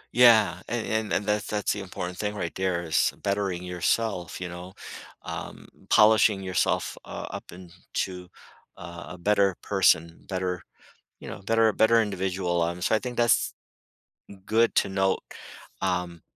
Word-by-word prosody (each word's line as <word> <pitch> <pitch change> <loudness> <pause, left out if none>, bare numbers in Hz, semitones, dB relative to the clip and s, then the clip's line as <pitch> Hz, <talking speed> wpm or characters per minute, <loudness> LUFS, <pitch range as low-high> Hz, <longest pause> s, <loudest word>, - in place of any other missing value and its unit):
Yeah, 110 -7 +6
and 120 0 -2
and 110 -1 -1
and 100 - 0
that's 105 0 0
that's 105 -1 0
the 105 - -5
important 90 -2 -6
thing 105 0 -2
right 85 -4 -3
there 95 -2 -1
is 80 -2 +2
bettering 100 -3 -1
yourself, 90 +1 -1
you 90 - -4
know, 90 +2 -9 0.5
um, - - -7 0.2
polishing 110 -2 +5
yourself, 95 -1 0
uh, - - -7
up - - -8
into 90 0 -6 0.5
a - - -10 0.3
a - - -10
better 100 +1 +2
person, 85 +1 +2
better 90 -2 -2 0.6
you - - -10
know, - - -7
better 115 +2 +3
better 115 +1 +4
individual, 95 -3 -1
um, 85 +1 -2
so - - +2
I 110 - +4
think 125 0 -6
that's 120 -1 +3 0.9
good 115 +2 +3
to - - +3
note, 95 0 +1 0.6
um, 90 -3 -2
95 Hz, 150 wpm, -26 LUFS, 90-105 Hz, 0.9 s, Yeah